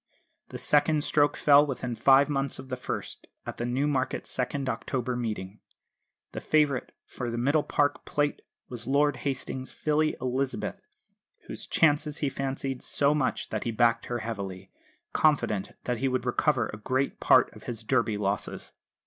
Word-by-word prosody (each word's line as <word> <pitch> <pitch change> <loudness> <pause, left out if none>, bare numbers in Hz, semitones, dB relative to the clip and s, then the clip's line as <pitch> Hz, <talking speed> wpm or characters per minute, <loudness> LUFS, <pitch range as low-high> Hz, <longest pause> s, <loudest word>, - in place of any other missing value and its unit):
The - - -6
second 150 +1 +2
stroke 145 -1 +2
fell 145 0 +6
within 130 -4 -3
five 135 +4 +5
months 140 -2 0
of 130 - -10
the 130 - -2
first 125 - -6 0.2
at - - -6
the 120 - -2
Newmarket 135 +1 0
second 130 +2 -2
October 130 -1 -2
Meeting. 105 -4 -4 0.7
The - - -6
favourite 150 -4 +1
for 120 -2 -5
the 115 - -3
Middle 145 +6 +2
Park 145 0 0
Plate 145 0 -1 0.3
was 120 -1 -8
Lord 145 0 +2
Hastings' 130 0 -4
filly, 155 0 +1
Elizabeth, 130 +1 -2 0.6
whose - - -8
chances 150 -1 +2
he 145 - 0
fancied 135 -1 -3
so 145 +1 +2
much 145 -4 -1
that - - -3
he - - -2
backed 115 0 +2
her 120 - -2
heavily, 95 -4 -6 0.4
confident 135 -10 +1
that 120 -2 -2
he 135 - +1
would 130 -1 -1
recover - - +1
a - - -6
great 130 +4 -1
part - - +4
of - - -13
his 115 -2 -5
Derby 115 -3 +1
losses. 100 0 -3
130 Hz, 160 wpm, -28 LUFS, 120-145 Hz, 0.7 s, fell